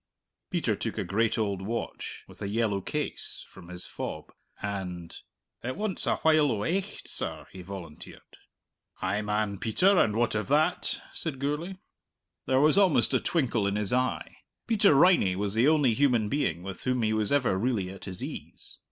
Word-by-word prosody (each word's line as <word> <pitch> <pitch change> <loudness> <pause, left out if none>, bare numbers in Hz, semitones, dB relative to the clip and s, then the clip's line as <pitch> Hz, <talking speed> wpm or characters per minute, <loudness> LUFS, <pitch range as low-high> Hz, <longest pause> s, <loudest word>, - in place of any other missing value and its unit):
Peter - - 0
took - - -4
a - - 0
great 110 +5 +1
old 100 -4 -1
watch, 115 +5 -5
with - - -16
a 100 - -2
yellow 105 -2 0
case, - - -4
from 85 - -14
his 90 0 -6
fob, - - -6 0.3
and, 90 -4 -5 0.4
"It 130 +2 -3
wants 210 -3 -2
a - - +3
while 155 -3 +4
o' 105 -2 -1
aicht, 190 - -2
sir," - - -4
he 95 - -9
volunteered. 90 -4 -10 0.7
"Ay, 100 +3 0
man, 105 -1 -1
Peter, 185 - +4
and 105 - +3
what 120 +1 +1
of 105 0 -1
that?" 155 +5 +1
said 155 -5 -4
Gourlay. 150 +7 -2 0.7
There 130 0 +3
was 155 +6 +5
almost 190 -6 +4
a - - +4
twinkle 120 -10 +1
in 100 - 0
his 105 +1 0
eye. 125 0 -1 0.3
Peter 205 -8 +4
Riney 140 - +5
was 100 +1 -1
the 115 +5 +4
only 150 -6 +4
human 120 -5 +2
being 90 - 0
with 95 0 -7
whom 125 -2 +1
he 110 0 +2
was 110 -1 0
ever 135 -9 +3
really 100 -3 0
at 95 - -10
his 95 -2 -6
ease. - - -7
110 Hz, 180 wpm, -28 LUFS, 100-145 Hz, 0.7 s, was